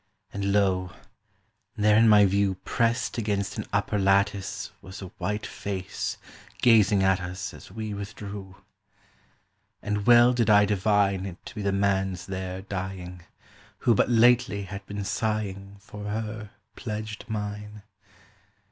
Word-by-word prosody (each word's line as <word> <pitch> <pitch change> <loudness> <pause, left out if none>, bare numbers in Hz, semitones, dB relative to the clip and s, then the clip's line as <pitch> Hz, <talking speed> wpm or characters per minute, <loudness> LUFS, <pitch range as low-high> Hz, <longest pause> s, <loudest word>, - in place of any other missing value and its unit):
And 100 0 -1
lo, 95 -2 +1 0.8
there 105 0 +4
in 115 +1 +6
my 105 -1 +7
view 100 0 +2
Pressed 115 -1 0
against 100 -3 -2
an - - -5
upper 105 - 0
lattice 100 0 +1
Was 95 +1 -10
a 95 - -7
white 105 +1 -2
face, 95 -2 -4 0.5
gazing 105 -4 +5
at 95 -1 +3
us 90 +1 -5
As - - -13
we 110 +1 -5
withdrew. 100 -1 -7 1.2
And 105 0 -3
well 120 +1 +7
did 115 -3 +1
I 105 -1 +6
divine 100 -1 +1
It 90 -2 -8
to - - -9
be 105 - -5
the 100 0 0
man's 95 -2 0
there 95 0 -5
dying, 90 -2 -6 0.6
Who 120 - +6
but 110 - +2
lately 120 -3 +4
had 100 +1 -7
been 100 0 -4
sighing 100 -1 -3
For 105 -1 -10
her 110 0 -4 0.3
pledged 110 -1 -5
mine. 105 -1 -5
100 Hz, 140 wpm, -26 LUFS, 95-105 Hz, 1.2 s, my